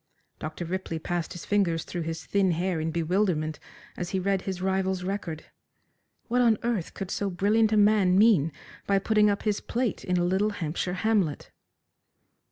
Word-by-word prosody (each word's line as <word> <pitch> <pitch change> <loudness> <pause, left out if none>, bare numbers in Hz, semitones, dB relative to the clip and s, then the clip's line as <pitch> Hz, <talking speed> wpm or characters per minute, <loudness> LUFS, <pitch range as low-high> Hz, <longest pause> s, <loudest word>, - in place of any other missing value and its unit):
Dr. 155 +3 -5
Ripley 180 -1 -3
passed 170 +1 -3
his 175 - -8
fingers 180 -6 +1
through 175 - -5
his 165 0 -5
thin 195 -3 +2
hair 175 0 -1
in 160 +1 -1
bewilderment 165 -2 0 0.4
as 175 -1 -4
he 190 - -1
read 195 0 0
his 190 -2 -4
rival's 190 0 0
record. 180 -5 -4 0.8
What 250 +1 +2
on 230 -3 +4
earth 230 -8 -2
could 195 -2 -5
so 200 - -1
brilliant 210 +4 +2
a 215 - +3
man 205 -3 +4
mean 195 -8 +5 0.4
by 200 - +3
putting 210 +1 +3
up 200 - -1
his 210 -2 0
plate 240 -2 -2
in 180 -1 0
a 175 - +2
little 190 +4 +2
Hampshire 180 0 -3
hamlet. 200 -10 +1
190 Hz, 175 wpm, -27 LUFS, 170-205 Hz, 0.8 s, mean